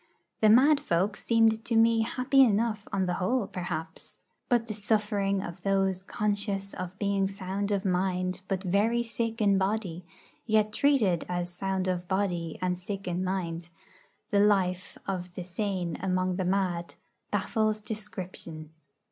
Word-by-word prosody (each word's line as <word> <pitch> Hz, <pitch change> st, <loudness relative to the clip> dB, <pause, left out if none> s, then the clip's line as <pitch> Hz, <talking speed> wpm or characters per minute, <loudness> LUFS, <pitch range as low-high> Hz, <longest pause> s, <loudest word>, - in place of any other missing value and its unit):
The 215 Hz, -, +5 dB
mad 275 Hz, +6 st, +6 dB
folk 190 Hz, +2 st, 0 dB
seemed 225 Hz, -1 st, +2 dB
to 230 Hz, -, -1 dB
me 225 Hz, 0 st, +5 dB
happy 255 Hz, +4 st, +3 dB
enough 220 Hz, -3 st, +2 dB
on 190 Hz, -1 st, +1 dB
the 180 Hz, -, 0 dB
whole, 235 Hz, +4 st, +1 dB
perhaps. 175 Hz, -4 st, -6 dB, 0.3 s
But 240 Hz, -3 st, +3 dB
the 220 Hz, -, -4 dB
suffering 205 Hz, -2 st, 0 dB
of 175 Hz, 0 st, -7 dB
those 195 Hz, -1 st, +1 dB
conscious 205 Hz, 0 st, -1 dB
of 185 Hz, 0 st, -6 dB
being 200 Hz, -1 st, +1 dB
sound 195 Hz, +1 st, -3 dB
of 200 Hz, -1 st, 0 dB
mind, 185 Hz, 0 st, 0 dB
but 190 Hz, -1 st, -2 dB
very 210 Hz, +6 st, +2 dB
sick 230 Hz, 0 st, -3 dB
in 200 Hz, -2 st, +4 dB
body, 190 Hz, -3 st, -1 dB, 0.4 s
yet 215 Hz, -1 st, +2 dB
treated 225 Hz, -, +3 dB
as 175 Hz, 0 st, -2 dB
sound 190 Hz, +1 st, -2 dB
of 180 Hz, -1 st, -2 dB
body 180 Hz, -4 st, -1 dB
and 180 Hz, -1 st, 0 dB
sick 195 Hz, 0 st, -6 dB
in 180 Hz, +1 st, -1 dB
mind 175 Hz, -3 st, -3 dB, 0.6 s
the 200 Hz, -, +4 dB
life 190 Hz, -3 st, +2 dB
of 180 Hz, -2 st, -3 dB
the 180 Hz, -, -4 dB
same 180 Hz, -2 st, -2 dB
among 185 Hz, -1 st, 0 dB
the 185 Hz, -, -1 dB
mad, 180 Hz, -2 st, -1 dB, 0.3 s
baffles 215 Hz, +1 st, 0 dB
description. 185 Hz, -7 st, -7 dB
195 Hz, 150 wpm, -28 LUFS, 180-215 Hz, 0.6 s, mad